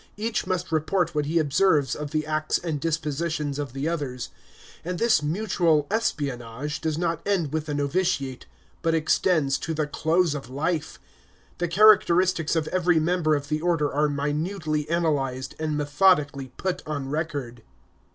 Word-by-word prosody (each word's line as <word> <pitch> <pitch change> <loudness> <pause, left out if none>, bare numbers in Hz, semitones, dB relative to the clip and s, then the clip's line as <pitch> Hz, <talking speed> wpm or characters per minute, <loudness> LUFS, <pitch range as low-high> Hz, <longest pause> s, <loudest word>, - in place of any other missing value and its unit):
Each 220 +1 -2
must 180 -2 -2
report 170 +2 +1
what 150 -1 -1
he 165 +3 0
observes 155 -1 +3
of 150 -1 -5
the 155 +1 -1
acts 155 0 0
and 160 -4 -3
dispositions 155 -2 -2
of 145 -4 -4
the 135 +3 -2
others; 145 -7 -3 0.5
and 180 +1 -3
this 230 -7 +3
mutual 160 -2 +1
espionage 140 - -2
does 160 -2 -1
not 165 -1 -1
end 175 -8 0
with 160 -1 -2
the 150 - -2
novitiate, 145 -3 -1 0.3
but 165 -1 +1
extends 155 -3 +2
to 160 - -3
the 155 -1 0
close 160 +2 +1
of 135 -5 -6
life. 155 +4 -2 0.6
The 175 - 0
characteristics 185 -4 +4
of 160 -1 0
every 175 -2 +2
member 160 -1 +2
of 145 0 -4
the 155 0 -1
Order 165 -4 +1
are 150 +1 +2
minutely 150 +2 -2
analyzed, 140 -6 -1
and 155 -1 -1
methodically 145 -3 +2
put 185 -1 -2
on 140 -3 -3
record. 145 -6 -3
155 Hz, 155 wpm, -25 LUFS, 145-170 Hz, 0.6 s, characteristics